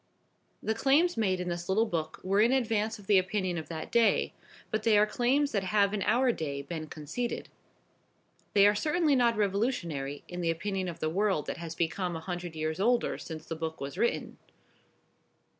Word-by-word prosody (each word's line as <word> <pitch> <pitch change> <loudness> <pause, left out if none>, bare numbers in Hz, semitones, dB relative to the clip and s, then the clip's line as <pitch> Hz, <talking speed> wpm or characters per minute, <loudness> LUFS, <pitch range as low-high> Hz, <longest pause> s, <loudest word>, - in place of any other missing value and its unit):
The 220 - +1
claims 285 +9 +3
made 190 -5 +1
in 180 - -3
this 175 +1 -4
little 215 +4 +3
book 160 -6 -3
were 195 +2 +2
in 230 +3 +4
advance 225 -4 +1
of 205 - -14
the 200 -1 +5
opinion 185 -2 -1
of 160 - -9
that 160 -2 -6
day, 235 -1 +3 0.4
but 215 - 0
they 215 -1 +4
are 210 - +6
claims 260 +6 +1
that 200 -3 -1
have 200 +1 +2
in 210 - -1
our 240 +6 +3
day 140 -8 -4
been 155 +2 -5
conceded. 160 +12 -4 1.0
They 200 -1 +6
are 205 - +6
certainly 300 +6 +2
not 235 -3 +3
revolutionary 185 - -1
in 180 0 -5
the 170 - 0
opinion 185 +3 -2
of 170 - -6
the 155 - +1
world 195 -4 +1
that - - -4
has 165 -1 -6
become 175 +2 -1
a - - -3
hundred 175 0 -5
years 155 +1 -2
older 240 +4 +2
since 160 -1 -7
the 165 - -4
book 160 0 -4
was 140 0 -5
written. 235 - -1
195 Hz, 190 wpm, -30 LUFS, 165-225 Hz, 1.0 s, are